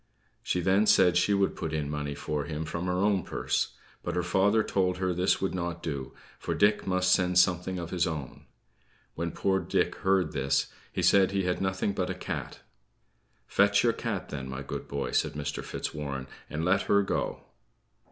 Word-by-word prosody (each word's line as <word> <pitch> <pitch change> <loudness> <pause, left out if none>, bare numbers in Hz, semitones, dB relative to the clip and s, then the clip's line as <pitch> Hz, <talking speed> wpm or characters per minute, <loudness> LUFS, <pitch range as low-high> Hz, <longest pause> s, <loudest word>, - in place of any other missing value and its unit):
She 90 -5 -1
then 95 +4 +3
said 90 -4 +5
she 90 +3 +3
would 100 0 +1
put - - -4
in 75 -2 -1
money 75 -1 -3
for 75 0 -3
him 80 0 -4
from 85 +3 -4
her 90 - 0
own 100 +1 +2
purse; - - -2 0.3
but - - -3
her 90 - +1
father 100 +5 +3
told 90 -3 0
her 95 -1 0
this 90 +2 +2
would 95 - -1
not 85 -1 -3
do, 70 -5 -4 0.3
for - - -2
Dick 105 0 +3
must 90 0 +2
send 90 -1 +3
something 90 +1 +3
of 85 -1 -5
his 90 -1 +1
own. 75 -6 -6 0.7
When 85 +1 -2
poor 95 +2 +1
Dick - - 0
heard 95 -3 +2
this, 70 0 0 0.2
he - - -2
said 95 -1 +5
he 100 0 0
had 90 0 -1
nothing 95 +1 0
but 95 -2 -2
a - - -2
cat. - - -5 0.8
"Fetch 100 0 +3
your 115 -1 +3
cat 110 -8 -4
then, 65 -2 -5
my 65 +1 -5
good - - -6
boy," 70 -1 -3
said - - +1
Mr. 70 -1 -4
Fitzwarren, 70 -3 -4 0.2
"and 80 +2 -2
let 95 +2 +3
her 100 0 +5
go." 95 - -2
90 Hz, 190 wpm, -28 LUFS, 80-95 Hz, 0.8 s, said